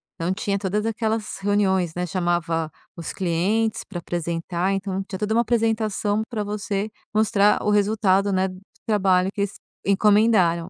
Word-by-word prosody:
então 170 +3 -1
tinha 200 +1 -1
todas 205 +2 -1
aquelas 220 -1 -2
reuniões, 190 -4 +1
né, 180 0 -1
chamava 170 -2 -1 0.2
os 170 -2 -6
clientes 195 +5 0
pra 175 - -7
apresentar 170 +2 -2
então 195 0 -2
tinha 190 -1 -7
toda 210 +1 0
uma 230 - +4
apresentação 220 -3 0
pra 215 -3 -3
você 205 0 -2 0.2
mostrar 210 -1 +3
o - - 0
resultado, 205 -1 +2
né, 190 0 +2 0.4
trabalho 190 -3 +3
que 200 - -3
eles 200 -1 -2 0.3
encomendaram. 200 -4 +3
200 Hz, 145 wpm, -23 LUFS, 180-210 Hz, 0.4 s, uma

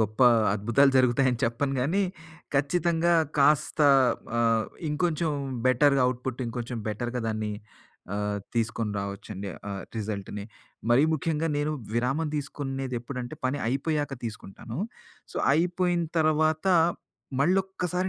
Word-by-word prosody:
గొప్ప 110 +2 -1 0.3
అద్భుతాలు 120 +7 +4
జరుగుతాయి 130 +1 +4
అని 125 - -2
చెప్పను 135 +4 -1
గాని 170 +10 +1 0.5
ఖచ్చితంగా 170 +4 +2 0.2
కాస్త 150 +2 +3 0.6
ఆహ్, 115 -2 +2 0.2
ఇంకొంచెం 160 +1 0 0.4
బెటర్‌గా 135 +2 +4
అవుట్‌పుట్ 125 0 -3
ఇంకొంచెం 120 0 -4
బెటర్‌గా 120 +3 -3
దాన్ని 110 -1 -2 0.6
ఆహ్, 105 0 -1 0.2
తీసుకొని 110 -2 -1
రావచ్చండి. 100 0 -6 0.2
ఆహ్, 100 -1 -4
రిజల్ట్‌ని. 105 -1 -4 0.5
మరీ 125 +4 +6
ముఖ్యంగా 160 +1 0
నేను 150 +1 0 0.2
విరామం 135 +7 0
దీసుకునేది 135 -2 -4
ఎప్పుడంటే 125 +2 -6
పని 130 +3 0
అయిపోయాక 145 +3 -1
తీసుకుంటాను. 110 +1 -7 0.5
సో, - - -9 0.2
అయిపోయిన 175 +2 +1 0.2
తర్వాత 155 +1 +2 0.8
మళ్ళొక్కసారి 185 +1 +1
135 Hz, 110 wpm, -27 LUFS, 115-155 Hz, 0.8 s, మరీ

